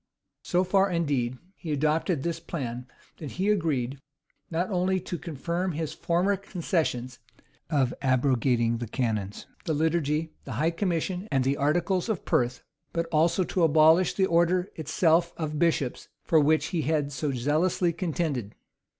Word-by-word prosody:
So 180 +1 +1
far, 195 +1 +3
indeed, 140 -8 0 0.2
he 160 - -6
adopted 155 +1 +1
this 170 -1 -2
plan, 125 -6 -5 0.3
that 150 -4 -7
he 190 +3 0
agreed, 140 -9 -1 0.5
not 175 +4 -1
only 185 +1 +1
to 175 - -5
confirm 170 +3 -3
his 160 0 -3
former 180 +4 +1
concessions, 160 - -2 0.5
of 135 -6 +1
abrogating 125 -3 +2
the 120 - -4
canons, 105 -5 -2 0.2
the 160 - 0
liturgy, 155 0 0
the 130 - -6
high 155 +9 +1
commission, 180 +2 -2
and 135 -1 +2
the 135 +2 +1
articles 175 +8 +1
of 210 -6 -2
Perth, 125 0 0 0.3
but 170 0 0
also 165 +4 +3
to 180 - -2
abolish 160 +2 +5
the 190 - +3
order 175 +1 +2
itself 165 +2 +2
of 155 -2 -3
bishops, 160 -7 0 0.2
for 160 - +4
which 155 +2 +2
he 170 - +1
had 150 -1 0
so 140 +2 -2
zealously 155 +7 +1
contended. 155 - -2
160 Hz, 150 wpm, -27 LUFS, 135-175 Hz, 0.5 s, abolish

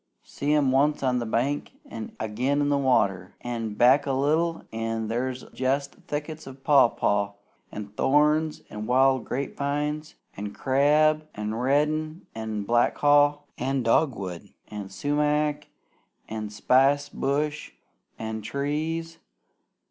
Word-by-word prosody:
See 145 +1 -3
'em 140 -3 +3
once 145 +2 +2
on 125 -1 +2
the 120 - -3
bank, 130 +6 -1
an' 110 -1 -8
agin 120 +7 0
in 145 0 +1
the 145 - +2
water! 100 -9 +1
An' 115 -3 -4
back 135 +5 +5
a 135 - +1
little 160 +5 +1
an' 115 -1 -2
there's 125 +2 -2
jest 135 +2 -1
thickets 150 +1 -5
of 135 0 -11
papaw, 105 -7 +3 0.4
an' 105 -1 -6
thorns, 150 +7 +2
an' 105 0 -5
wild 130 -1 +3
grape 135 +1 -3
vines, 150 +2 -2 0.2
an' 100 +1 -5
crab, 150 +3 +3
an' 105 +1 -3
red 150 +6 0
an' 110 -2 -4
black 120 +3 +2
haw, 145 0 +4 0.2
an' 135 +1 0
dogwood, 105 - 0 0.2
an' 105 -2 -6
sumac, 150 +5 0 0.6
an' 110 -1 -5
spicebush, 140 +5 +1 0.5
an' 110 0 -4
trees! 155 +7 -3
135 Hz, 125 wpm, -26 LUFS, 115-150 Hz, 0.6 s, back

